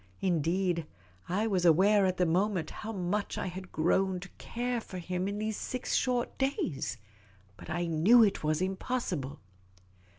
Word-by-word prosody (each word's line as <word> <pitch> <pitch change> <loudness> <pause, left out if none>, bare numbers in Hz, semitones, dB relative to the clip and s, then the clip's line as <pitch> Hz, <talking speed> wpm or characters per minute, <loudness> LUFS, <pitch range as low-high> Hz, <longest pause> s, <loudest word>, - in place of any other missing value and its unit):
Indeed, 175 -1 +1 0.4
I 200 +5 +1
was 190 -5 +1
aware 190 +4 +5
at 185 -1 -1
the 180 - +3
moment 185 +1 +1
how 220 - -6
much 200 +1 -2
I - - -2
had 185 0 -7
grown 185 +3 +1
to 195 - -9
care 245 0 -2
for 185 - -8
him 180 +1 -2
in 200 +1 -3
those 215 0 -2
six 255 -1 -3
short 245 -2 0
days. 265 - -1 0.6
But 100 - -12
I 175 +1 -1
knew 175 +9 +6
it 200 -6 +1
was 155 +3 +1
impossible. 185 - -3
185 Hz, 160 wpm, -30 LUFS, 175-210 Hz, 0.6 s, knew